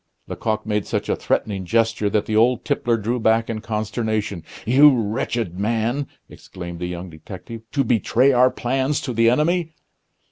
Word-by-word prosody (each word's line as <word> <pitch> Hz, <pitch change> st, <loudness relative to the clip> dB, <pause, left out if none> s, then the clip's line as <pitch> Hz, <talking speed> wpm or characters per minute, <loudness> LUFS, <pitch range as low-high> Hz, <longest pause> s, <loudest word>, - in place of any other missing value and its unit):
Lecoq 110 Hz, -1 st, -3 dB
made 105 Hz, -2 st, -1 dB
such -, -, -2 dB
a -, -, +2 dB
threatening 100 Hz, -3 st, -1 dB
gesture 110 Hz, +2 st, +1 dB
that 105 Hz, 0 st, 0 dB
the 110 Hz, -, -2 dB
old 120 Hz, +3 st, +3 dB
tippler 120 Hz, -5 st, +1 dB
drew 115 Hz, +3 st, -2 dB
back 115 Hz, +1 st, +2 dB
in 110 Hz, -1 st, -4 dB
consternation. 110 Hz, -3 st, -2 dB, 0.2 s
"You 130 Hz, +3 st, +6 dB
wretched 110 Hz, -3 st, -2 dB
man!" 115 Hz, +6 st, 0 dB, 0.2 s
exclaimed 85 Hz, -2 st, -9 dB
the 90 Hz, -, -3 dB
young 90 Hz, 0 st, -6 dB
detective, 95 Hz, +8 st, -9 dB
"to 140 Hz, -, +1 dB
betray 120 Hz, +3 st, +3 dB
our 125 Hz, 0 st, +5 dB
plans 130 Hz, +3 st, -1 dB
to 125 Hz, -, -4 dB
the 115 Hz, 0 st, +4 dB
enemy!" 160 Hz, +5 st, +1 dB
115 Hz, 165 wpm, -22 LUFS, 105-125 Hz, 0.2 s, You